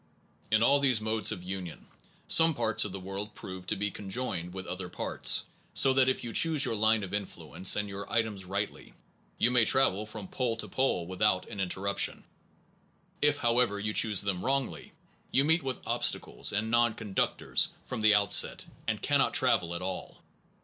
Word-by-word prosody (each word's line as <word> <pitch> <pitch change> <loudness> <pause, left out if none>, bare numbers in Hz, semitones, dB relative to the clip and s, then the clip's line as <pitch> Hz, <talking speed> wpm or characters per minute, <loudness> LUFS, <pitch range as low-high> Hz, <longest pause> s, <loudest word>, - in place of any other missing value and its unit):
In 110 +1 +3
all 140 +3 +4
these 130 -5 +3
modes 110 0 0
of 95 -5 -6
union, 90 -3 -7 0.4
some 160 -1 +5
parts 110 -4 +2
of 100 - -5
the 95 - -6
world 100 +3 -6
prove 95 -1 -9
to - - 0
be 105 0 -2
conjoined 95 -4 -4
with 95 0 -7
other 90 0 -6
parts, - - -1 0.3
so 135 - +6
that 130 0 +3
if 130 - -2
you 115 -1 -6
choose 160 -4 +5
your - - -1
line 110 0 +2
of 95 - -7
influence 100 -2 0
and 105 0 -2
your 100 0 -8
items 110 -4 -1
rightly, 100 +3 -5 0.4
you 120 - +2
may 125 -2 +4
travel 110 -4 +3
from 110 -3 -8
pole 120 0 -2
to 115 - -5
pole 130 -10 -1
without 95 +1 0
an 100 - -8
interruption. 95 +1 -1 1.0
If, 150 0 +3
how 120 -1 +1
ever, 105 -5 +1
you 105 +1 -3
choose 105 -3 +3
them 100 -3 -3
wrongly, 135 -1 -2 0.4
you 135 - +2
meet 165 +3 +2
with 135 -2 -5
obstacles - - 0
and 110 +2 -2
non 120 -1 +2
conductors 105 -4 0 0.2
from - - -5
the 105 -1 +5
outset, 100 -1 +2 0.2
and - - -2
cannot - - +2
travel 85 +1 +2
at 85 - -5
all. 95 0 -6
105 Hz, 185 wpm, -29 LUFS, 95-120 Hz, 1.0 s, so